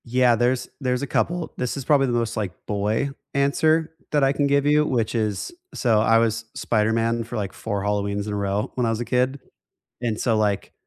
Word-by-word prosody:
Yeah, 125 Hz, 0 st, +3 dB
there's 120 Hz, +2 st, +1 dB
there's 125 Hz, -2 st, 0 dB
a 140 Hz, -, -3 dB
couple. 175 Hz, +3 st, -1 dB
This 125 Hz, +2 st, -2 dB
is 135 Hz, -, -5 dB
probably 140 Hz, -3 st, +4 dB
the 120 Hz, -, -1 dB
most, 115 Hz, -1 st, 0 dB
like, 105 Hz, -5 st, -2 dB
boy 105 Hz, +6 st, 0 dB, 0.2 s
answer 155 Hz, +4 st, +2 dB, 0.2 s
that 145 Hz, -2 st, +3 dB
I 135 Hz, +1 st, +4 dB
can 145 Hz, 0 st, +1 dB
give 140 Hz, 0 st, +2 dB
you, 150 Hz, +1 st, +4 dB
which 120 Hz, -6 st, 0 dB
is 110 Hz, -, -1 dB, 0.2 s
so 115 Hz, -4 st, +2 dB
I 115 Hz, +1 st, +4 dB
was 115 Hz, 0 st, +1 dB
Spider-Man 115 Hz, +1 st, +1 dB
for, 120 Hz, +2 st, -8 dB
like, 100 Hz, -2 st, -3 dB
4 100 Hz, -3 st, -3 dB
Halloweens 100 Hz, 0 st, -1 dB
in 105 Hz, -, -3 dB
a -, -, -1 dB
row 100 Hz, +1 st, -1 dB
when 125 Hz, -, +1 dB
I -, -, +1 dB
was 115 Hz, 0 st, -1 dB
a 120 Hz, -, -3 dB
kid, 130 Hz, +3 st, +1 dB, 0.6 s
and 115 Hz, -3 st, -1 dB
so, 115 Hz, -3 st, +1 dB
like, 105 Hz, -2 st, 0 dB
115 Hz, 215 wpm, -23 LUFS, 110-135 Hz, 0.6 s, probably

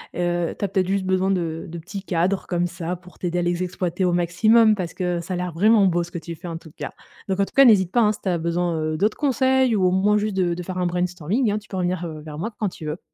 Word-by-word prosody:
heu -, -, -5 dB
heu, 175 Hz, -1 st, 0 dB
tu -, -, -6 dB
as -, -, 0 dB
peut-être 185 Hz, -1 st, 0 dB
juste 195 Hz, -1 st, 0 dB
besoin 185 Hz, 0 st, +1 dB
de 165 Hz, -3 st, -2 dB
de 170 Hz, -, -7 dB
petits 195 Hz, +4 st, -7 dB
cadres 185 Hz, +1 st, 0 dB
comme 175 Hz, -1 st, 0 dB
ça 175 Hz, 0 st, -4 dB
pour 180 Hz, 0 st, -17 dB
t'aider 175 Hz, -1 st, -1 dB
à -, -, +1 dB
les 175 Hz, +1 st, 0 dB
exploiter 180 Hz, 0 st, -2 dB
au 180 Hz, -, +2 dB
maximum 215 Hz, +6 st, +4 dB
parce 180 Hz, -4 st, -4 dB
que 180 Hz, -2 st, -1 dB
ça 170 Hz, +2 st, -5 dB
a 180 Hz, -, -2 dB
l'air 180 Hz, 0 st, -3 dB
vraiment 205 Hz, +5 st, +4 dB
beau 175 Hz, -1 st, +2 dB
ce 175 Hz, -, -10 dB
que 175 Hz, -, -5 dB
tu 170 Hz, +1 st, -7 dB
fais 175 Hz, +2 st, -10 dB
en 165 Hz, -, -4 dB
tout 160 Hz, -1 st, -14 dB
cas, -, -, -6 dB, 0.4 s
donc 190 Hz, -1 st, -1 dB
en -, -, +3 dB
tout -, -, -16 dB
cas, 275 Hz, -, +8 dB
n'hésite 190 Hz, -7 st, +5 dB
pas, 240 Hz, -, +3 dB
hein, 210 Hz, -1 st, +4 dB
si 210 Hz, -, -10 dB
tu 195 Hz, -, -2 dB
as 175 Hz, -, +1 dB
besoin, 170 Hz, +1 st, -1 dB
heu, 155 Hz, 0 st, -2 dB
d'autres 210 Hz, +4 st, +1 dB
conseils 260 Hz, -3 st, +2 dB
ou 190 Hz, -3 st, +2 dB
au 180 Hz, -, +4 dB
moins 200 Hz, +3 st, +3 dB
juste 210 Hz, -1 st, -1 dB
de 175 Hz, -2 st, +2 dB
de 180 Hz, +1 st, -5 dB
faire 185 Hz, +1 st, -5 dB
un 180 Hz, -, 0 dB
brainstorming 180 Hz, -, 0 dB
hein, 205 Hz, -, 0 dB
tu 210 Hz, -, -20 dB
peux -, -, -7 dB
revenir, 180 Hz, -1 st, -1 dB
heu, 155 Hz, -2 st, -7 dB
vers 150 Hz, -1 st, -9 dB
moi 220 Hz, +7 st, -3 dB
q -, -, -39 dB
quand 210 Hz, -, 0 dB
tu 160 Hz, -3 st, -10 dB
veux. 155 Hz, +3 st, -4 dB
180 Hz, 310 wpm, -23 LUFS, 170-200 Hz, 0.4 s, cas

